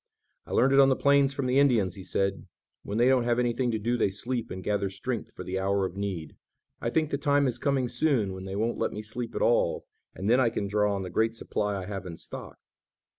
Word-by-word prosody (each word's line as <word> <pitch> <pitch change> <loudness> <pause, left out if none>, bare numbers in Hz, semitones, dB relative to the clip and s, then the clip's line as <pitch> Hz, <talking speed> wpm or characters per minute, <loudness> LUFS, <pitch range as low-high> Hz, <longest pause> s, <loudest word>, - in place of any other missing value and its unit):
"I - - -10
learned 135 +2 +4
it 135 - +6
on 135 0 +7
the 130 - +3
plains 140 0 +4
from 135 -1 -3
the 125 +2 +3
Indians," 115 -10 +3
he 95 - -9
said. 95 +1 -1 0.3
"When 100 - -4
they 120 +2 +4
don't 130 -2 +4
have 120 0 +2
anything 125 +1 +1
to 110 - 0
do 120 +3 -1
they 105 - +2
sleep 115 +4 -3
and 95 0 -6
gather 100 -1 0
strength 115 +4 -4
for - - -8
the 95 +1 -3
hour 100 0 +1
of 95 - -5
need. 95 -6 -4 0.5
I 115 - -1
think 155 +3 0
the 140 - -1
time 145 0 +3
is 120 -2 -1
coming 135 -3 +1
soon 120 -9 +1
when 95 0 -7
they 95 0 -5
won't 115 +3 -1
let - - -1
me 105 - -5
sleep 115 +2 -5
at - - 0
all, 115 -7 +2 0.3
and 95 - -4
then 120 +4 +4
I 125 -3 +4
can 110 - -3
draw 105 0 +1
on 95 - -3
the 90 - -6
great 110 +5 +1
supply 105 -3 -2
I 95 - -6
have 95 -1 -6
in 85 -2 -7
stock." - - -8
110 Hz, 255 wpm, -28 LUFS, 100-130 Hz, 0.5 s, on